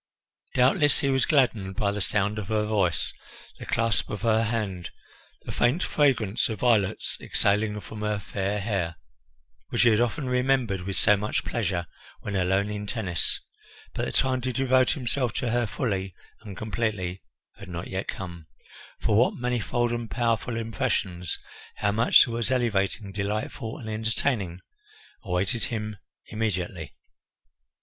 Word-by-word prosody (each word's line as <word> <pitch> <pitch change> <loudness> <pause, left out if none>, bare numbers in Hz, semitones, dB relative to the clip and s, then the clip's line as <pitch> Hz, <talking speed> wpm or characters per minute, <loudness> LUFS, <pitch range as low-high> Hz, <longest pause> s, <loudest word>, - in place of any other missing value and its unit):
Doubtless 135 +4 +4
he 140 - +1
was 130 -2 +2
gladdened 115 - +2
by 105 -2 +1
the 105 0 -3
sound 105 +2 +1
of 100 - -5
her 105 0 +1
voice, 100 -6 +1 0.5
the - - -8
clasp 115 -1 +1
of 105 -1 -5
her 115 0 +3
hand, 105 -6 -2 0.5
the - - -6
faint 130 +10 +2
fragrance 120 -8 +2
of 110 -3 -5
violets 110 -6 +2
exhaling 105 +1 +1
from 105 +5 -8
her 105 0 0
fair 100 0 -2
hair, 95 -6 -1 0.7
which 120 - +2
he 120 - +7
had 110 0 +4
often 125 +4 0
remembered 125 -6 +1
with 95 +1 -4
so 105 - +5
much 105 +2 -2
pleasure 95 -6 -1 0.4
when 105 - -4
alone 95 +2 +1
in 105 0 -4
Tennis; 100 -8 0 0.5
but - - -1
the - - -3
time 130 -1 +1
to 130 +1 -1
devote 130 0 +3
himself 125 -3 0
to 120 - -1
her 120 -1 +1
fully 95 -5 -2 0.2
and 100 -3 -9
completely 105 -5 -2 0.4
had 100 - -10
not 85 0 -5
yet 95 +1 -4
come, 85 -4 -6 0.5
for 105 - +2
what 120 +4 +4
manifold 120 -1 0
and 120 -1 -3
powerful 115 -1 0
impressions, 110 - -1 0.4
how 100 - +1
much 115 +3 +6
that 120 - -6
was 115 +1 -1
elevating, 105 -5 0
delightful, 105 +3 -3
and 110 - -8
entertaining 110 -4 -1 0.6
awaited 95 +3 0
him 110 -2 -4 0.3
immediately! 90 - -3
110 Hz, 150 wpm, -26 LUFS, 95-120 Hz, 0.7 s, he